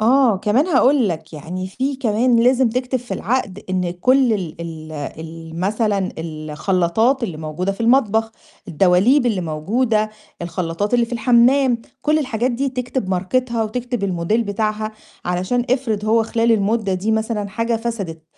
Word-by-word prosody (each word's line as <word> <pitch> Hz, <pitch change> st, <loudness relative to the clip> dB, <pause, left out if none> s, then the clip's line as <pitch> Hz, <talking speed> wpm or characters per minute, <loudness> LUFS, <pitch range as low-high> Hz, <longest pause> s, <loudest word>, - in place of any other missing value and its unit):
...آه، 240 Hz, -1 st, +4 dB
كمان 210 Hz, -, +2 dB
هاقول 270 Hz, -, +4 dB
لك، 165 Hz, -2 st, -5 dB
يعني 175 Hz, +5 st, -5 dB
في 265 Hz, +8 st, -2 dB
كمان 240 Hz, -1 st, +2 dB
لازم 250 Hz, +1 st, +4 dB
تكتب 250 Hz, +2 st, -1 dB
في 245 Hz, +1 st, -6 dB
العَقْد 210 Hz, -5 st, -2 dB
إن 180 Hz, -2 st, 0 dB
كل 255 Hz, +8 st, +3 dB
ال 175 Hz, -6 st, -4 dB
ال 160 Hz, -2 st, -7 dB
ال 160 Hz, +2 st, -7 dB
مثلًا 205 Hz, -1 st, 0 dB
الخلّاطات 170 Hz, -, 0 dB
اللي 180 Hz, -9 st, -3 dB
موجودة 155 Hz, +5 st, -3 dB
في 195 Hz, -, -12 dB
المطبخ، 225 Hz, -2 st, +2 dB, 0.4 s
الدواليب 195 Hz, -, +4 dB
اللي 215 Hz, -6 st, +1 dB
موجودة، 215 Hz, +8 st, 0 dB, 0.3 s
الخلّاطات 170 Hz, +5 st, -2 dB
اللي 235 Hz, -1 st, +3 dB
في -, -, -13 dB
الحمّام، 245 Hz, +2 st, +4 dB, 0.2 s
كل 300 Hz, +1 st, +2 dB
الحاجات 255 Hz, -4 st, -1 dB
دي 265 Hz, +3 st, -1 dB
تكتب 250 Hz, -4 st, -3 dB
ماركتها 225 Hz, +6 st, 0 dB
وتكتب 245 Hz, 0 st, -3 dB
الموديل 190 Hz, +5 st, 0 dB
بتاعها 215 Hz, +1 st, -2 dB, 0.3 s
علشان 185 Hz, +8 st, 0 dB
افرض 230 Hz, -6 st, 0 dB
هو 225 Hz, +1 st, +3 dB
خلال 230 Hz, +1 st, +1 dB
المُدّة 210 Hz, -1 st, +1 dB
دي 190 Hz, +4 st, -1 dB
مثلًا 220 Hz, -2 st, -1 dB
حاجة 230 Hz, +3 st, -1 dB
فسدت 205 Hz, -9 st, -4 dB
220 Hz, 150 wpm, -20 LUFS, 180-245 Hz, 0.4 s, آه